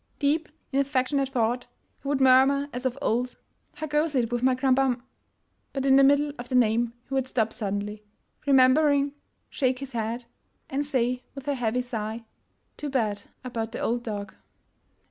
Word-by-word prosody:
Deep 305 +3 +1 0.2
in 275 - +1
affec 270 -2 +1
tionate 275 -2 +1
thought, 245 -1 0 0.3
he - - -8
would 280 -1 +1
murmur 265 +2 +5
as 250 +2 -1
of 255 +1 -4
old, 245 +3 0
' - - -45
' - - -43
How 310 - -4
goes 300 0 0
it 240 -2 +1
with 240 -1 0
my 255 0 +3
Krambam 260 -1 +2 0.2
—. - - -46
' - - -47
' - - -45
But 270 -1 -2
in 270 -1 +6
the 275 - +7
middle 285 +1 +4
of 245 - -7
the 255 - -1
name 235 -1 +3
he 275 - -7
would 265 -1 +1
stop 225 -4 0
suddenly, 205 +1 -3 0.4
remembering, 280 +1 +5 0.4
shake 255 -2 +1
his 270 0 -7
head, 230 +1 -3 0.5
and 275 +2 0
say 250 -3 0
with 275 0 -9
a 285 - +2
heavy 245 -1 0
sigh 225 -2 -4 0.2
— - - -45
" - - -45
Too 295 - -4
bad 215 -7 0 0.2
about 230 -2 -4
the - - -4
old 240 +1 0
dog! 205 -4 -5
255 Hz, 205 wpm, -26 LUFS, 235-275 Hz, 0.5 s, the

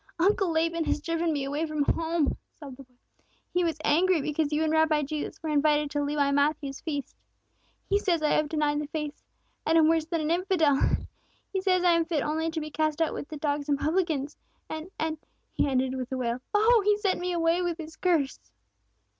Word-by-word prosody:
"Uncle 385 +1 +2
Laban 330 0 0
has - - 0
driven 330 +1 -1
me 285 -3 -1
away 285 +3 -2
from 305 -1 0
home!" 325 0 0 0.2
sobbed 275 -5 -10
the 275 - -11
boy. 250 0 -34 0.6
"He 360 - +2
was 325 -3 0
angry 355 +3 +3
because 300 +1 -1
you 305 +1 +1
and 315 0 +1
Rabbi 315 -1 +3
Jesus 295 +1 -4
were 315 - -2
invited 295 0 +2
to 290 -1 -1
Levi 285 -1 +1
Matthew's 285 -1 0
feast. 290 -4 -4 0.7
He 405 - +2
says 345 -6 0
I 300 - +2
have 305 -1 +2
denied 300 -1 0
the 295 - -5
faith, 300 -1 -5 0.4
and 325 - +3
am 315 -1 +6
worse 325 -1 +2
than 335 -1 -1
an 305 +1 -1
infidel. 340 -6 +2 0.7
He 380 - 0
says 370 -2 +2
I 355 - +5
am 335 -1 +3
fit 320 -4 -1
only 320 +2 -1
to 320 0 -3
be 305 0 -6
cast 310 0 0
out 325 -2 +1
with - - -6
the 310 - -7
dogs 290 0 -2
and 285 - +3
publicans! 310 -2 -1 0.3
and 315 +3 -6
and 315 -1 -2 0.2
" - - -46
he - - +1
ended 260 -1 +1
with 255 -1 -5
a 260 - -2
wail. 245 0 -2
"Oh, 440 +2 +5
he 415 0 +3
sent 400 -3 0
me 360 +1 -2
away 335 0 +2
with 350 -2 -1
his 320 -1 -8
curse!" 325 -7 +1
315 Hz, 215 wpm, -27 LUFS, 290-335 Hz, 0.7 s, am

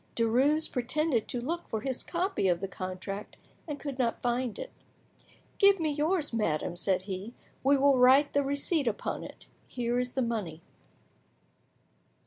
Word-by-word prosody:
Derues 265 +7 +3
pretended 255 0 0
to 245 - -3
look 335 +8 -4
for 220 - -2
his 260 +1 -3
copy 360 - -1
of 175 -2 +2
the 195 - -3
contract, 185 +2 -6 0.3
and 295 -2 -5
could 280 -3 -6
not 235 -2 0
find 245 -1 -1
it. - - -6 0.9
"Give 400 -1 +6
me 315 -2 0
yours, 305 0 0
madame," 175 -6 -1
said 185 +1 0
he; 195 +4 -6 0.3
"we 275 +1 +5
will 275 -1 +4
write 265 +4 +6
the 285 - +3
receipt 285 +1 0
upon 215 - -2
it. - - -9 0.2
Here 245 0 -1
is 250 0 -2
the 260 - 0
money." 195 -9 -3
250 Hz, 155 wpm, -29 LUFS, 215-290 Hz, 0.9 s, Give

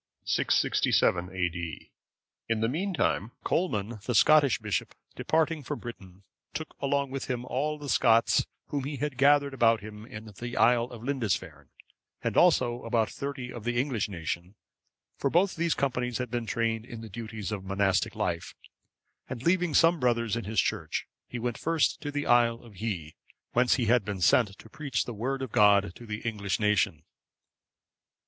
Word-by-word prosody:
[667 90 0 +2
A.D.] 90 -3 -4 0.6
In 115 -1 +1
the 115 - +2
meantime, 160 - -1
Colman, 110 - -1
the 125 - 0
Scottish 145 +3 +5
bishop, 105 -2 -3 0.2
departing 160 0 +1
from 145 +2 -4
Britain,(556) 95 -5 -12
took 155 0 -9
along 140 -1 0
with 135 0 -4
him 125 -1 -3
all 150 +4 -1
the 145 -1 -8
Scots 115 -3 +3 0.2
whom 140 -2 -2
he 145 +1 -3
had 145 -1 -2
gathered 140 +1 +4
about 115 -4 +3
him 105 +1 -10
in 110 -4 -9
the 120 0 -5
isle 120 0 +4
of 120 -2 -11
Lindisfarne, 125 - -2 0.5
and - - -1
also 125 -8 +4
about 115 -3 0
thirty 135 -3 -5
of 120 - -8
the 120 +1 0
English 125 -6 -1
nation, 85 +1 -5 0.6
for 140 - +1
both 180 +6 +2
these 170 -1 +1
companies 125 -3 -1
had 125 -3 -4
been 120 -2 -2
trained 115 -1 0
in 115 -2 -9
duties 110 -1 -6
of 105 -2 -3
the 95 - -13
monastic 95 -1 +1
life; - - -2 0.7
and 125 -1 -6
leaving 175 -2 +2
some 165 0 +5
brothers 115 -3 +1
in 115 - -4
his 110 +2 0
church, - - -1 0.2
he 125 - -6
went 120 0 -3
first 165 -2 +1
to 145 - -4
the 145 0 -2
isle 120 -1 +4
of 115 -3 -14
Hii,(557) 90 -8 -4 0.4
whence 125 0 +3
he 125 - 0
had 120 0 +3
been 100 -1 -4
sent 100 +2 +3
to - - -14
preach 135 0 -2
the 120 - -5
Word 130 +5 -2
of 130 - -6
God 100 -3 +4
to 120 - -12
the 105 0 -4
English 100 -4 -2
nation. 105 -7 +1
120 Hz, 170 wpm, -28 LUFS, 105-140 Hz, 0.7 s, Scottish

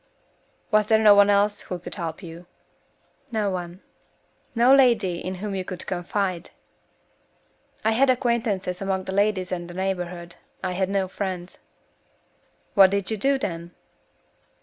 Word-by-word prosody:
"Was 215 -1 +3
there 220 - +5
no 215 -1 +7
one 205 0 +6
else 205 +1 +2
who 180 - -5
could 175 - -9
help 170 0 -4
you?" 170 +1 -10 0.8
"No 215 -3 0
one." 180 0 -6 0.7
"No 240 +3 +5
lady 225 -10 +4
in 185 +1 -4
whom 200 +2 -5
you 190 -1 -2
could 180 -1 -7
confide?" 185 0 -2 1.4
"I 220 - +4
had 260 +4 +3
acquaintances 225 -8 0
among 190 -1 -1
the 190 - -5
ladies 195 -2 +1
in 175 -1 -3
the 175 - -10
neighborhood. 180 -2 -4 0.3
I 185 - -1
had 190 +1 -1
no 195 -1 0
friends." 185 -2 -5 1.1
"What 195 -1 +7
did 200 +2 -2
you 220 - -1
do, 275 +6 +2
then?" 170 -8 -5
190 Hz, 150 wpm, -24 LUFS, 180-210 Hz, 1.4 s, no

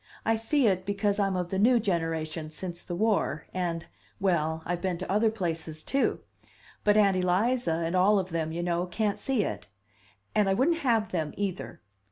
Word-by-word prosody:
I 225 - +3
see 240 +5 +1
it, 185 -3 +2
because 200 +1 0
I'm 195 -2 +1
of 180 -1 -2
the 190 - 0
new 240 +3 +5
generation, 165 -5 -2
since 175 +2 -5
the 175 - -5
war, 200 -7 0
and 170 -2 -2 0.3
well, 160 -4 0
I've 175 0 -2
been 185 -2 -1
to 185 - -5
other 215 +3 +3
places, 165 -6 -4
too. 275 0 0 0.6
But 210 0 +4
Aunt 200 -3 +4
Eliza, 185 +3 +1
and 170 +3 -1
all 195 +3 +5
of 185 -2 -2
them, 160 -1 -1
you 170 +1 -3
know, 175 +1 0
can't 205 +3 -1
see 265 -6 +1
it. 105 - -5 0.7
And 210 -2 +3
I 195 - +3
wouldn't 325 - +2
have 230 -7 +1
them, 160 -4 -2
either! 175 - -4
185 Hz, 190 wpm, -28 LUFS, 170-210 Hz, 0.7 s, new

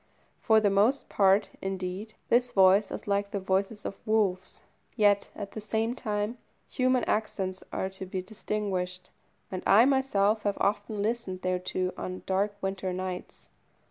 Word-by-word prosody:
For 220 -1 +4
the 205 -2 +2
most 215 +8 +2
part, 195 0 +4
indeed, 190 +3 -4
this 245 +1 +3
voice 195 +1 +5
is - - -7
like 200 0 0
the 200 - -3
voices 195 +2 -1
of - - -5
wolves, 195 -4 0 0.3
yet, 205 -3 +3
at 200 -2 -6
the 215 - -6
same 220 +2 -1
time, 215 -1 -3 0.3
human 255 -1 +1
accents 190 -3 -2
are 190 - -1
to 190 0 -6
be 185 0 -4
distinguished, 190 -3 -3 0.4
and 185 -1 -3
I 215 +5 +7
myself 225 -6 +2
have 205 -1 -1
often 205 0 0
listened 210 -5 -2
thereto 185 0 -1
on 185 0 -5
dark 200 +2 0
winter 190 -1 -2
nights. 185 0 -6
200 Hz, 150 wpm, -28 LUFS, 190-215 Hz, 0.4 s, I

